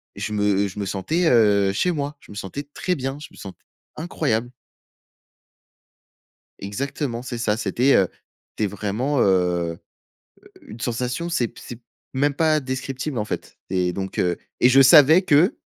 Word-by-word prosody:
je 105 - -4
me 100 -1 +1
je 100 - -8
me 100 - -2
sentais, 105 - -1
heu, 100 -4 +4
chez 180 - +1
moi. 145 -2 -4
Je - - -17
me - - -10
sentais 100 +8 -6
très 180 - -1
bien, 135 -1 -4
je - - -8
me - - -18
sentais 95 - -11 0.3
incroyable. 135 -8 -2 2.1
Exactement, 120 +4 -4
c'est 125 -1 -6
ça, 110 -2 0
c'était, 120 +5 +2
heu, 95 - +4 0.4
c'était 110 - -2
vraiment, 110 +8 -2
heu, 90 -4 +1 0.8
u - - -13
une 115 - -11
sensation, 125 +7 -2
c'est 125 -9 0
p - - -15
c'est 120 - -8 0.4
même 140 +2 +1
pas, 155 +1 +2
descriptible 130 +1 -4
en 105 - -1
fait - - -6
et 90 -1 0
donc 95 +1 -5
heu 90 -1 +1 0.2
et 125 - +6
je 135 +2 +6
savais 150 +4 +8
que 170 +1 +3
120 Hz, 165 wpm, -22 LUFS, 100-145 Hz, 2.1 s, savais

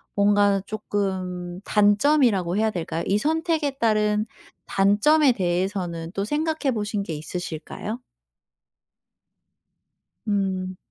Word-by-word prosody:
뭔가 205 -1 +3
쪼끔 185 -4 -3
단점이라고 205 - +3
해야 220 +1 +2
될까요? 170 -3 -3
이 200 - +2
선택에 320 +3 0
따른 215 -4 +1 0.4
단점에 245 +9 +4
대해서는 175 -3 -2
또 195 - -2
생각해 300 +4 -1
보신 210 -2 -2
게 170 - -5
있으실까요? 170 +7 -5 2.3
음. 190 -2 -1
205 Hz, 220 characters per minute, -24 LUFS, 185-225 Hz, 2.3 s, 단점에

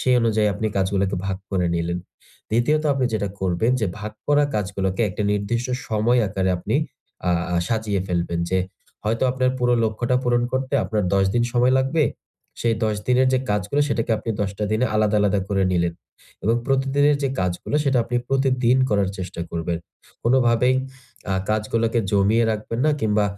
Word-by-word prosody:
সেই 130 -1 +3
অনুযায়ী 110 -2 +2
আপনি 110 +2 -2
কাজগুলোকে 95 0 0
ভাগ 95 -1 -1
করে 90 -3 +1
নিলেন। 85 +1 -1 0.5
দ্বিতীয়ত 150 +8 +2
আপনি 130 -2 +1
যেটা 100 -2 -1
করবেন 95 +6 +1
যে 105 - +1
ভাগ 105 0 -6
করা 145 0 +4
কাজগুলোকে 95 0 -1
একটা 100 +3 -3
নির্দিষ্ট 115 +4 -1 0.2
সময় 115 +3 +2
আকারে 95 -1 0
আপনি 90 - -1 0.5
আ - - +3 0.2
আ - - +2
সাজিয়ে 110 -4 0
ফেলবেন 85 -2 -1
যে 95 - +2 0.5
হয়তো 115 +3 0
আপনার 130 0 +1
পুরো 125 0 +2
লক্ষ্যটা 120 +3 0
পূরণ 120 0 +2
করতে 130 0 -2
আপনার 105 +1 -1
১০ 95 0 +4
দিন 120 - +3
সময় 125 +1 +3
লাগবে। 140 +4 +1 0.6
সেই 115 -1 +2
১০ 105 -1 0
দিনের 125 +1 +4
যে 130 - +3
কাজগুলো, 105 +7 0
সেটাকে 115 -4 -1
আপনি 115 +2 -4
১০ 100 - 0
টা 105 - 0
দিনে 120 +4 +2
আলাদা, 105 -1 +2
আলাদা 100 -1 +2
করে 100 -1 +1
নিলেন। 85 -1 +1 0.5
এবং 115 +2 +3
প্রতিদিনের 140 +2 +2
যে 135 - +1
কাজগুলো 90 +10 -1
সেটা 135 -2 +2
আপনি 120 0 -2
প্রতিদিন 130 -2 +2
করার 100 -2 +2
চেষ্টা 90 -2 -5
করবেন। 85 0 -2 0.4
কোনো 120 +3 +3
ভাবেই 125 +2 +3 0.6
আ - - +1 0.2
কাজ 110 0 +1
গুলোকে 115 +1 +1
জমিয়ে 105 +4 +3
রাখবেন 110 +2 -4
না - - +4
কিংবা 105 -1 +2
110 Hz, 175 wpm, -22 LUFS, 100-125 Hz, 0.6 s, করা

